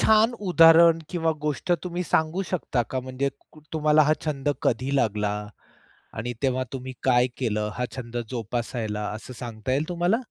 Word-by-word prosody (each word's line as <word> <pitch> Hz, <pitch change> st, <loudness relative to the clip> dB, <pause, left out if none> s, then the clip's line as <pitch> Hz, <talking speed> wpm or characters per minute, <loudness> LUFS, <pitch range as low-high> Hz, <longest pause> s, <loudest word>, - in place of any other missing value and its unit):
छान 220 Hz, +2 st, +5 dB, 0.2 s
उदाहरण 165 Hz, 0 st, +7 dB
किंवा 165 Hz, -2 st, +1 dB
गोष्ट 150 Hz, +4 st, 0 dB
तुम्ही 180 Hz, 0 st, -3 dB
सांगू 160 Hz, +4 st, +1 dB
शकता 145 Hz, -8 st, -1 dB
का 130 Hz, -, +1 dB
म्हणजे 130 Hz, +2 st, -2 dB, 0.2 s
कु 155 Hz, -, -16 dB
तुम्हाला 155 Hz, -1 st, +4 dB
हा 155 Hz, -, +5 dB
छंद 145 Hz, -2 st, -1 dB, 0.2 s
कधी 130 Hz, +4 st, -1 dB
लागला 105 Hz, -4 st, +1 dB, 0.9 s
आणि 120 Hz, +3 st, -3 dB
तेव्हा 130 Hz, -1 st, +1 dB
तुम्ही 130 Hz, -1 st, -5 dB, 0.2 s
काय 125 Hz, 0 st, +4 dB
केलं 105 Hz, -4 st, -1 dB
हा 125 Hz, -, 0 dB
छंद 120 Hz, -2 st, -7 dB
जोपासायला 115 Hz, -2 st, -3 dB
असं 125 Hz, -, -10 dB
सांगता 115 Hz, 0 st, -4 dB
येईल 145 Hz, +4 st, 0 dB
तुम्हाला? 175 Hz, +4 st, +1 dB
130 Hz, 155 wpm, -25 LUFS, 120-160 Hz, 0.9 s, उदाहरण